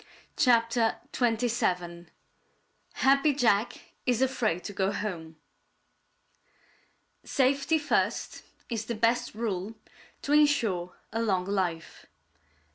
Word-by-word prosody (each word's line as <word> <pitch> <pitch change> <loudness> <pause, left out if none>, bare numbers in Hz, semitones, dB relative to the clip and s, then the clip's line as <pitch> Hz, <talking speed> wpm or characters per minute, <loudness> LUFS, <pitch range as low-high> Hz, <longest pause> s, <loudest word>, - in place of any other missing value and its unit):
CHAPTER 230 -2 +3 0.2
XXVII 215 -8 -1 0.9
HAPPY 275 +2 +3
JACK 225 -4 +2 0.3
IS 250 0 +2
AFRAID 230 -9 0
TO 205 - -6
GO 195 0 0
HOME 170 -6 -5 1.9
Safety 275 +3 +1
first 300 -1 -1 0.3
is 225 -3 -3
the 235 - -3
best 230 +1 +1
rule 215 -2 -3 0.5
to 285 - 0
insure 230 -13 +2 0.2
a 225 - -1
long 190 -5 0
life. 185 -5 -3
225 Hz, 95 wpm, -28 LUFS, 190-250 Hz, 1.9 s, CHAPTER